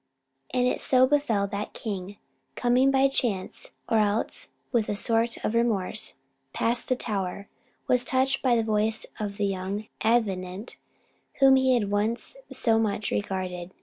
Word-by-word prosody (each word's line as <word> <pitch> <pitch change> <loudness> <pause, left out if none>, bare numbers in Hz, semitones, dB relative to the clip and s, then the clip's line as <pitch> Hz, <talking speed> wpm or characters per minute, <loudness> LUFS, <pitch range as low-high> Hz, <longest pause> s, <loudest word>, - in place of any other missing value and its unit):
And 250 0 +1
it 250 - 0
so 255 -1 +5
befell 260 -8 +1
that 200 +1 -5
the - - -9
king, 200 -3 -5 0.4
coming 250 +2 +3
by 270 0 +4
chance, 230 -8 -2 0.2
or 225 - +3
else 210 +1 0 0.2
with 235 -4 +1
a 205 - 0
sort 230 +2 +1
of - - 0
remorse, 220 -3 0 0.4
past 235 +1 +1
the 255 - +3
tower, 200 -4 -3 0.4
was 250 -1 +4
touched 265 +2 +1
by 250 -3 +3
the 230 - +2
voice 220 0 0
of 205 -2 -4
the 205 - 0
young 195 +2 -3
Avenant, 200 -3 0 0.6
whom 270 -1 +6
he 260 -1 +4
had 205 -4 0
once 215 - -1 0.2
so 225 -1 +2
much 210 -2 -1
regarded. 185 -2 -3
220 Hz, 155 wpm, -26 LUFS, 200-245 Hz, 0.6 s, whom